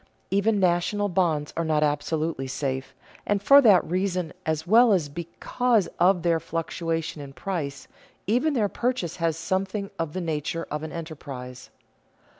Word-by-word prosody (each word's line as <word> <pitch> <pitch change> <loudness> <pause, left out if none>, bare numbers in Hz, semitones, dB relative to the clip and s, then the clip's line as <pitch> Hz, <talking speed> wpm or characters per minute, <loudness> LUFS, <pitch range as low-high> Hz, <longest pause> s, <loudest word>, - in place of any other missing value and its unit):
Even 200 +2 +2
national 190 +3 +1
bonds 165 -5 0
are 165 - 0
not 155 -1 +1
absolutely 150 -1 -1
safe, 130 0 -3 0.3
and 205 -1 0
for 280 +8 +7
that 210 -8 +6
reason 180 -1 -1
as 160 0 -1
well 225 +4 +6
as 165 -7 +1
because 195 - 0
of 180 0 +4
their 170 -1 +2
fluctuation 165 -1 -3
in 140 -1 -9
price, 145 -6 -4 0.4
even 250 - +1
their 215 -4 +2
purchase 240 -6 -2
has 165 -2 0
something 195 +3 -2
of 165 -2 -2
the 185 - -3
nature 165 0 -2
of 150 0 -2
an 160 0 -6
enterprise. 135 -6 -8
170 Hz, 150 wpm, -25 LUFS, 155-195 Hz, 0.4 s, for